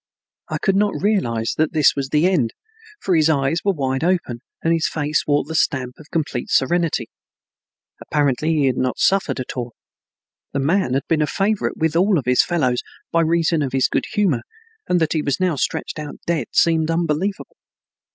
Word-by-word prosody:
I - - -2
could 195 - +1
not 205 +1 +1
realize 120 - 0
that 155 +1 +1
this 155 -3 +4
was 135 -1 -3
the 155 +4 +3
end, 150 -12 +1 0.4
for 185 - 0
his 160 0 +4
eyes 140 +2 +1
were 200 - +3
wide 135 -3 -2
open 170 -9 0 0.2
and 165 - +3
his 165 -1 +1
face 150 0 -1
wore 145 0 +2
the 155 +4 -7
stamp 130 -5 0
of 155 - -14
complete 150 -7 -2
serenity. 165 -3 +1 1.0
Apparently 145 0 0
he 145 -3 +2
had 130 -2 +1
not 130 -1 -1
suffered 195 -7 +1
at 130 - -5
all. 120 -2 -5 0.8
The 140 - 0
man 140 -2 +1
had 135 - 0
been 160 -2 +1
a 150 - +1
favorite 205 +4 -1
with 160 -1 0
all 185 +1 +3
his 125 0 +4
fellows 130 -8 0 0.3
by 165 - +3
reason 165 0 +1
of 135 -3 -2
his 135 -1 +3
good - - -1
humor, 180 - +1 0.5
and 180 - +3
that 160 -2 +1
he 155 - 0
was 140 -3 -1
now 180 -3 +1
stretched 140 - -3
out 150 -1 -6
dead 170 -3 -1
seemed 160 -1 +2
unbelievable. 170 +4 -1
155 Hz, 190 wpm, -21 LUFS, 135-170 Hz, 1.0 s, this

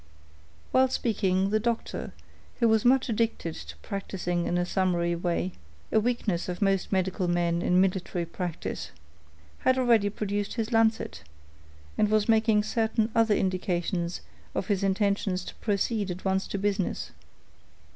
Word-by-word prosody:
While 260 0 +5
speaking, 195 -6 0
the 215 - +3
doctor, 235 +1 -2 0.5
who 235 - +4
was 220 -1 +3
much 260 +1 +4
addicted 225 -7 -1
to 80 - -9
practicing 180 -3 -2
in 175 - 0
a 175 - +1
summary 175 -2 +1
way,—a 170 - -2
weakness 215 -6 -1
of 180 - -4
most 195 -2 +1
medical 190 -1 0
men 175 -1 +1
in 180 +1 +3
military 185 -2 0
practice,—had 80 - -4
already 230 -5 +4
produced 205 0 -3
his 225 -1 -2
lancet, 225 -1 +1 0.8
and 210 - +4
was 215 -1 +2
making 220 -2 +4
certain 220 +1 0
other 225 -2 +4
indications 180 -2 -1 0.3
of 190 - -2
his 200 -2 +1
intentions 195 -1 0
to - - -8
proceed 205 0 0
at 180 +2 -6
once 190 0 +1
to - - -3
business. 200 -1 -1
195 Hz, 135 wpm, -27 LUFS, 175-220 Hz, 0.8 s, While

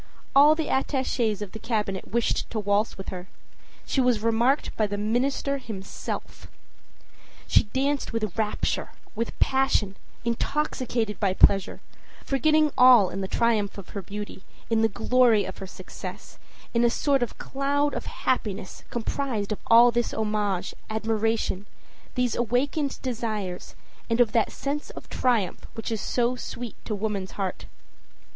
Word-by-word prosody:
All 295 +3 +8
the 320 -1 -2
attaches 255 -6 0
of 195 - -8
the 220 - -8
Cabinet 210 -5 -2
wished 235 +2 0
to 225 - -2
waltz 205 +1 +1
with 195 - -7
her. 180 0 -6 0.6
She 270 - +1
was 245 -4 +2
remarked 235 +5 +2
by 215 - +1
the 205 0 -3
minister 260 +6 0
himself. 205 -7 -6 1.0
She - - +4
danced 275 +6 -1
with 215 -5 -2
rapture, 215 -2 -1 0.2
with 230 +1 -3
passion, 265 -7 +2 0.3
intoxicated 235 -3 -1
by 195 -3 +1
pleasure, 195 0 +4 0.4
forgetting 305 +3 +3
all 250 -7 +7
in 195 - -4
the 190 - -2
triumph 215 -2 +1
of 200 - -9
her 200 - -5
beauty, 205 +1 -7 0.3
in 225 -1 +3
the 225 - +4
glory 235 -1 +3
of 190 - -7
her 195 - -6
success, - - -9 0.3
in 235 0 +3
a 240 - +5
sort 275 +2 +1
of 245 - -2
cloud 285 +1 0
of - - -4
happiness 205 -7 -2
comprised 235 -3 -2
of 210 - -2
all 235 +1 +8
this 240 0 -1
homage, 210 -4 -1 0.2
admiration, 220 -2 -1 0.5
these 250 -2 +1
awakened 270 +5 0
desires 215 -7 -3 0.3
and 230 +1 +1
of 235 -3 +5
that 225 -1 +2
sense 290 +2 -3
of - - -10
triumph 235 -8 0
which 225 +1 -4
is 220 - -2
so 245 0 +1
sweet 245 -2 -6
to 215 - -2
woman's 200 -2 -3
heart. 195 -2 -3
225 Hz, 150 wpm, -26 LUFS, 205-255 Hz, 1.0 s, All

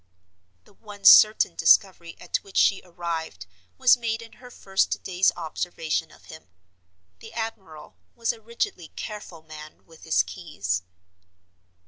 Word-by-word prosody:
The - - -23
one 205 -1 -13
certain 215 -4 +7
discovery 170 +1 +2
at 175 - -2
which 195 - -10
she 195 - +3
arrived 165 - -6 0.3
was 260 0 +6
made 230 -2 -3
in 225 - -15
her 250 - -12
first 195 -5 -1
day's 185 0 +2
observation 160 -1 -3
of - - -20
him. 160 -9 -13 0.7
The - - -13
admiral 195 -9 -7 0.2
was 230 0 -1
a 225 - -16
rigidly 220 -6 -4
careful 205 -7 -8
man 155 -1 -12
with 165 -1 -18
his 160 - +2
keys. 100 - -4
180 Hz, 135 wpm, -25 LUFS, 160-215 Hz, 0.7 s, certain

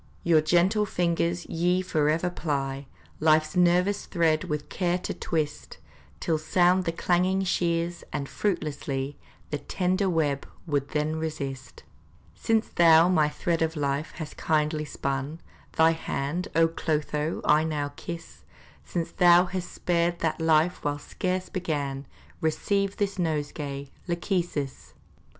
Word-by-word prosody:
Your 165 -2 +5
gentle 180 +7 +3
fingers 170 -1 0
ye 180 +2 +1
forever 160 +1 +1
ply, 140 -4 -3 0.3
Life's 155 +2 +3
nervous 180 +3 +3
thread 160 -3 +2
with 150 -1 -3
care 175 -1 0
to 180 - -4
twist, 150 -3 -3 0.4
Till 160 -2 0
sound 180 +3 +3
the 165 - +1
clanging 180 +3 +1
shears, 170 -1 0
and 140 - -3
fruitlessly 145 -7 -2 0.3
The 150 - -1
tender 185 +4 0
web 150 -5 0 0.2
would 145 -4 -1
then 155 +1 -1
resist. 140 -4 -5 0.5
Since 225 -1 0
thou 165 0 +6
my 155 -5 +3
thread 165 +2 -1
of 160 0 0
life 140 +1 -1
hast 155 -2 -7
kindly 155 0 0
spun, 140 +2 -3 0.3
Thy 160 0 +5
hand, 160 +1 -3
O 165 0 +5
Clotho, 155 -1 -2
I 150 +1 +5
now 145 -3 -2
kiss! 170 +1 -8 0.4
Since 170 -2 -3
thou 175 -1 +6
hast 180 0 -5
spared 170 0 0
that 160 -1 -1
life 160 +2 +3
whilst 145 0 -3
scarce 185 0 -2
begun, 145 -7 -3 0.3
Receive 200 +5 0
this 200 -1 -1
nosegay, 145 -4 -3 0.2
Lachesis! 170 -6 -2
160 Hz, 130 wpm, -27 LUFS, 150-175 Hz, 0.5 s, thou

